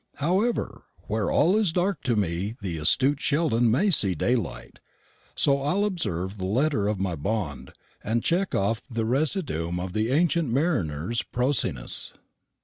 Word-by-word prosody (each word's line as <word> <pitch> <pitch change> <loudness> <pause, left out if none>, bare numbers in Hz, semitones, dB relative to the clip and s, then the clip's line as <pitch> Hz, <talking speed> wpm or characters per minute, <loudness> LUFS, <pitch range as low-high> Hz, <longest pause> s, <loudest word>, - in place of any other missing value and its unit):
However, 190 +11 -1 0.2
where 110 -1 -1
all 180 +5 +3
is 215 -6 +2
dark 185 +4 0
to 120 - +2
me 100 +2 -1
the 90 -5 -4
astute 135 - +2
Sheldon 140 -6 +2
may 190 - +2
see 100 - +3
daylight, 120 +8 -2 0.6
so 140 -1 +2
I'll 185 +9 +1
observe 100 - -2
the 95 - -2
letter 120 0 +1
of 105 -2 -1
my 95 -3 -1
bond, 75 - -3 0.3
and 115 +2 -1
check 185 +3 0
off 105 +3 0
the 115 -2 -2
residuum 125 - 0
of 90 0 -4
the 110 +1 0
ancient 165 0 +2
mariner's 115 - 0
prosiness. 120 - 0
115 Hz, 145 wpm, -25 LUFS, 95-155 Hz, 0.6 s, all